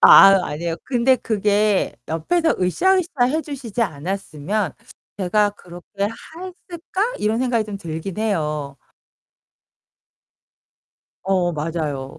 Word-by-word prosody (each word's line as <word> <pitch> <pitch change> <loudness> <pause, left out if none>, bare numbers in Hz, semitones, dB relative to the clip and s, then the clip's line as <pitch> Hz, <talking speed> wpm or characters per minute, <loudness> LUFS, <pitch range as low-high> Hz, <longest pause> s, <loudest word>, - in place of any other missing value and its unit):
아 - - +8 0.3
아니에요. 165 +3 -3
근데 255 0 +3
그게 210 -2 +1
옆에서 320 - +1
으쌰으쌰 325 - +2
해 305 +6 +1
주시지 260 -6 -3
않았으면 180 +1 -2 0.5
제가 205 +2 +2
그렇게 175 -3 -13 0.5
했을까? 370 +4 -4
이런 215 +2 +1
생각이 245 -3 +1
좀 205 -1 -6
들긴 170 +1 -6
해요. 150 -9 -1 2.5
어 185 -2 +1
맞아요. 150 -3 -3
200 Hz, 225 characters per minute, -21 LUFS, 165-250 Hz, 2.5 s, 아